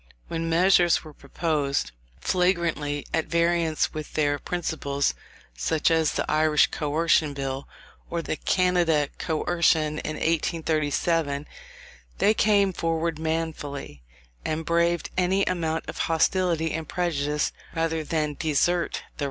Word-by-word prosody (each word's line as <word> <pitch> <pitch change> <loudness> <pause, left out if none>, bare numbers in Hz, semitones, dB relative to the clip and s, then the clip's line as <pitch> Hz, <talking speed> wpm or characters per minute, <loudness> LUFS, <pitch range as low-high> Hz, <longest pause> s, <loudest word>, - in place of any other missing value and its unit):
When 165 0 -2
measures 175 0 +4
were 155 -2 -11
proposed, 140 - -1 0.3
flagrantly 170 - 0
at 160 - 0
variance 170 -1 +1
with 155 -1 -6
their 145 -2 +1
principles, 140 -5 -1 0.4
such 155 - +1
as 160 -2 +2
the - - -1
Irish 155 -1 +3
Coercion 150 0 +1
Bill, 135 0 -4 0.4
or 170 -1 -2
the - - -2
Canada 170 -5 +2
Coercion 160 -2 +1
in 155 - -4
1837, 155 -2 0 0.7
they 210 - +4
came 205 -3 +3
forward 165 -1 -1
manfully, 160 - -4 0.4
and 155 +1 -2
braved 170 +1 +1
any 190 +2 +2
amount 165 -3 -1
of - - -6
hostility 165 0 +1
and 160 0 -4
prejudice 150 -4 0 0.2
rather 165 -1 0
than 150 -1 -1
desert 165 +3 +1
the - - -2
right. - - -24
160 Hz, 120 wpm, -25 LUFS, 150-170 Hz, 0.7 s, measures